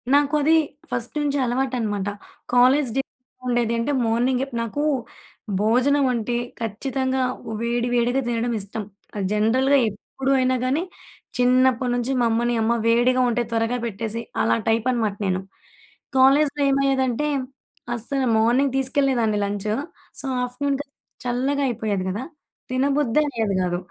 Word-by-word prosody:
నాకు 290 +1 +3
అది 315 +3 +4 0.4
ఫస్ట్ 240 +1 -3
నుంచి 285 -1 0
అలవాటనమాట. 240 -5 -1 0.5
కాలేజ్ 255 +2 +5
డేస్‌లో 270 -1 -4
ఎలా - - -30
ఉండేది 240 -1 +1
అంటే 230 +5 0
మార్నింగే 245 +3 +1 0.2
నాకూ 230 +6 -2 0.8
భోజనం 260 +6 +3
అంటే 235 +1 -2 0.3
ఖచ్చితంగా 260 +4 -1 0.4
వేడి 240 +1 0
వేడిగా 245 +3 +2
తినడం 235 0 -1
ఇష్టం. 210 +2 -5 0.3
అది 200 -2 -2
జనరల్‌గా 255 +6 +3
ఎప్పుడు 265 +6 -4
అయినా 255 0 +2
గానీ, 280 +6 +1 0.5
చిన్నప్పడి 250 0 +3
నుంచి 245 +2 -1
మా - - +3
అమ్మని, 240 +2 +1
అమ్మ 225 +2 +2
వేడిగా 240 +2 +3
ఉంటే 240 0 0
త్వరగా 225 +2 0
పెట్టేసెయి. 230 +1 -4 0.2
అలా - - +3
టైప్ 225 +2 +2
అనమాట 220 -5 0
నేను. 185 -1 0 0.8
కాలేజ్‌లో 280 +2 +4
ఏమయ్యేదంటే 270 -1 +1 0.7
అస్సల 265 +4 -2 0.2
మార్నింగ్ 250 +4 +3
తీసుకెళ్ళేదాన్ని 265 -5 +1
లంచు, 205 +1 -2 0.4
సో, - - -3 0.2
ఆఫ్టర్‌నూన్‌కది 275 +3 -3 0.3
చల్లగా 265 +4 0
అయిపోయేది 210 -5 -2
గదా! 205 +7 -3 0.5
తినబుద్దే 275 +1 +2
అయ్యేది 220 -6 -1
గాదు. 180 -1 0
245 Hz, 130 wpm, -23 LUFS, 225-270 Hz, 0.8 s, కాలేజ్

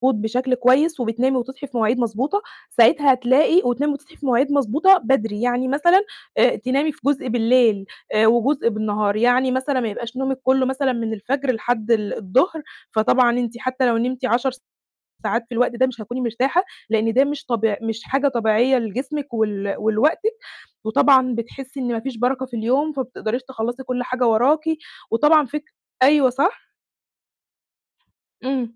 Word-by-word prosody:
بشكل 250 +5 -1
كويس، 260 +5 +2
وبتنامي 245 +3 0
وتصحي 265 +3 -6
في 255 -2 -6
مواعيد 230 +2 +1
مضبوطة، 245 - -1 0.3
ساعتها 270 +3 +4
هتلاقي 260 +8 +3
وتنامي 280 +5 0
وتصحي 285 +1 -12
في 290 - -9
مواعيد 265 +2 +2
مضبوطة 285 - +4
بدري، 225 - -1
يعني 245 +1 0
مثلًا، 345 +8 +4 0.4
آآ، - - +4
تنامي 270 +7 -1
في 295 - -21
جزء 280 -2 0
بالليل، 230 -3 +2 0.3
آآ، 220 +1 +4
وجزء 240 +3 +2
بالنهار، 210 -1 -1
يعني 245 +3 +2
مثلًا 260 +1 -1
ما 235 - -2
يبقاش 235 +4 -7
نومِك 265 0 -2
كُلُّه 260 0 +2
مثلًا 265 0 0
من 230 -2 -3
الفجر 265 +6 -2
لحد 230 -1 -2
ال 210 -3 0
الضهر، 265 - 0 0.3
فطبعًا 240 +2 +2
أنتِ 240 -2 -3
حتى 255 +1 -1
لو 235 -1 +2
نمتِ 255 +2 -2
10 250 +2 +1 0.7
ساعات 230 0 -1
في - - -12
الوقت 245 +1 +2
ده 260 +2 +3
مش 245 -3 -7
هتكوني 240 +4 -6
مرتاحة، 255 - 0 0.3
لأن 225 0 +1
ده 260 +4 +4
مش 285 0 -4
طبيع 225 -4 0
مش 225 0 -4
حاجة 275 +1 +1
طبيعية 240 +1 +2
لجسمِك 260 +4 -5
ول 205 -3 -1
ولوقتِك، 225 - +1 0.5
وطبعًا 255 +3 +3
بتحسي 260 +4 -7
إن 245 -2 -2
مفيش 240 +2 -5
بَرَكة 255 +2 -1
في 245 -2 -8
اليوم، 260 +7 0
فما 275 -2 -2
بتقدريش 245 0 -4
تخلّصي 245 +1 -4
كُلّ 250 -1 -3
حاجة 250 0 -1
وراكِ، 255 +8 +3 0.5
وطبعًا 295 +5 +4
فك 300 +4 -5 0.4
أيوه 275 -1 +5
صح؟ 280 - -1 1.8
امم. 255 -3 -3
250 Hz, 165 wpm, -21 LUFS, 230-270 Hz, 1.8 s, أيوه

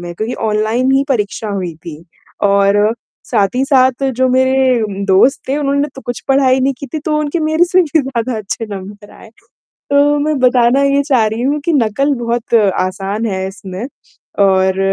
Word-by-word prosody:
में 175 0 -7
क्योंकि 220 +6 -4
ऑनलाइन 220 +4 0
ही 270 +1 +2
परीक्षा 220 -3 -2
हुई 185 -4 -4
थी 160 -1 -8 0.4
और 200 +2 +3 0.3
साथ 200 -1 +1
ही 260 +2 +1
साथ 260 -1 +2
जो 260 +1 +2
मेरे 260 -1 +2
उम, 200 -2 -4
दोस्त 195 +8 +3
थे 270 - 0
उन्होंने 280 0 0
तो 270 - -9
कुछ 245 -2 -6
पढ़ाई 265 -1 +3
नहीं 270 +1 +1
की 280 - -7
थी, 310 - -5
तो 305 0 -1
उनके 300 +3 -2
मेरे 315 +2 +2
से 365 +1 +2
भी 320 -1 +1
ज़्यादा 255 -3 -3
अच्छे 215 +2 -5
नंबर 205 +1 -9
आए, - - -15 0.6
तो 290 +1 +3
मैं 300 0 -1
बताना 250 +1 +3
ये 280 0 +2
चाह 260 -6 +2
रही 220 +2 -3
हूँ 285 +3 0
कि 340 - 0
नकल 275 +2 +1
बहुत 235 0 -2 0.3
आसान 195 +4 -3
है 190 -3 -2
इसमें 190 +1 -8 0.6
और 190 -1 +2
245 Hz, 185 wpm, -15 LUFS, 205-275 Hz, 0.6 s, और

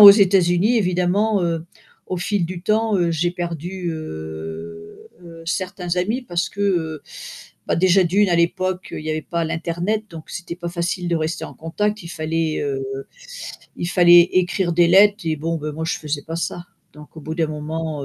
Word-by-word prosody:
aux 205 -1 +14
États-Unis 195 +1 +4
évidemment, 190 +3 +2
heu, 165 -1 -2 0.4
au 185 - -3
fil 195 +1 0
du 175 0 -6
temps, 215 +1 +2
heu, 170 -1 +2
j'ai 170 +2 +1
perdu, 175 +1 -4
heu 80 - -7
heu, 165 -1 -11
certains 185 -1 -2
amis 215 +9 0
parce 175 -7 -1
que, 200 - -8
heu, 165 -6 0 0.6
bah, - - +1
déjà 185 +2 +5
d'1 195 +3 +3
à 175 - +3
l'époque, 185 +2 0
il - - -4
y 155 - -2
avait 155 0 -1
pas 170 +1 -2
l'internet, 170 +6 -2
donc 160 -2 -10
c'était 175 -1 -6
pas 175 -1 -5
facile 175 +1 -2
de 170 - +1
rester 160 +1 -2
en - - -8
contact, 210 +6 -2
il 170 - -9
fallait, 160 -1 -1
heu, 140 -2 -2 0.9
il 175 - -3
fallait 175 -1 +7
écrire 180 0 +1
des 170 +1 +5
lettres 205 +2 +5
et 160 - +1
bon, 165 +3 -2
ben 150 0 -4
moi, 160 +2 -4
je - - 0
faisais 150 -1 -3
pas 165 +2 -5
ça, 170 +1 -3 0.3
donc 150 +1 -14
au 160 - -7
bout 160 +2 -5
d'un 160 -2 +1
moment, 155 -1 -4
175 Hz, 190 wpm, -21 LUFS, 160-185 Hz, 0.9 s, aux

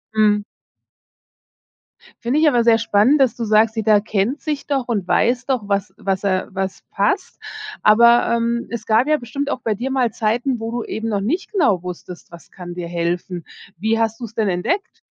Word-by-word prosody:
Mhm. 210 -1 +3 1.8
Finde 245 +5 +1
ich 315 - +4
aber 240 -5 +2
sehr 230 -1 +6
spannend, 225 +5 +3
dass 260 -5 +3
du 235 - -4
sagst: 220 +1 +3
„Jeder 215 -2 +3
kennt 215 +6 -1
sich 300 -3 -3
doch 270 -4 -1
und 205 -6 -2
weiß 250 +1 +2
doch, 260 -4 0
was 200 0 -1
was 190 -1 -2
er 185 -2 0
was 190 0 -4
passt.“ 205 - -1 0.4
Aber, 235 +2 +5
ähm, 235 0 -1
es 230 -2 -5
gab 225 +5 +3
ja 305 - +4
bestimmt 280 +2 -4
auch 250 - -3
bei 220 - 0
dir 245 +6 -4
mal 255 -4 +1
Zeiten, 235 +3 -1
wo 225 0 -4
du 240 0 -3
eben 220 +1 -4
noch 205 -3 -1
nicht 310 - -2
genau 285 - +2
wusstest, 180 0 -9
was 170 -1 -14
kann 175 -2 -9
dir 175 -1 -5
helfen? 175 0 -3 0.3
Wie 220 +4 0
hast 225 0 -1
du's 230 -2 -7
denn 220 -2 0
entdeckt? 260 - -2
225 Hz, 190 wpm, -20 LUFS, 200-245 Hz, 1.8 s, sehr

